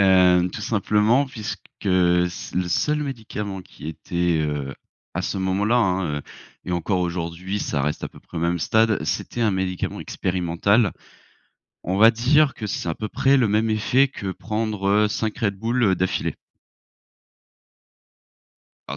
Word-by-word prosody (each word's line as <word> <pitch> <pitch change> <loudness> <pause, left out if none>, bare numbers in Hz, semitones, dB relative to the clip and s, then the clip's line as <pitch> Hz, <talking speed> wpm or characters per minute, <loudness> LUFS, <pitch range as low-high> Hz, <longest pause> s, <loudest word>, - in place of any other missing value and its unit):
Hem, 90 -2 +5
tout - - -7
simplement 110 +5 +2
puisque 110 -4 -6 0.2
c 90 -2 +1
le 90 -1 0
seul 150 - +1
médicament 105 -7 -5
qui 80 - -10
était, 85 +1 -1
heu, 75 -2 -3 0.4
à - - -1
ce - - -2
moment-là, 100 +5 +1
hein, 95 -8 +1
heu, - - -8 0.4
et 90 - -3
encore 90 +2 0
aujourd'hui, 90 +2 -3
ça 70 -7 -1
reste 75 +2 -2
à - - -4
peu - - -16
près - - -12
au - - -1
même 85 +1 +1
stade, 110 +3 +2
c'était 120 +9 -3
un 110 - +3
médicament 95 -1 -2
expérimental. 95 +4 +1 0.9
On 95 +2 -1
va 115 +2 +8
dire 135 +5 +3
que 110 - -5
c'est 90 - -3
à 80 - -1
peu 110 +4 -5
près 135 +4 +3
le 120 -5 +3
même 110 +2 +2
effet 125 +6 +3
que 100 -7 -6
prendre 105 -1 0
5 110 0 -2
Red 100 -5 0
Bull 115 -2 +2
d'affilée. 95 +1 -1 2.5
Ah, 70 - -4
95 Hz, 155 wpm, -23 LUFS, 90-110 Hz, 2.5 s, va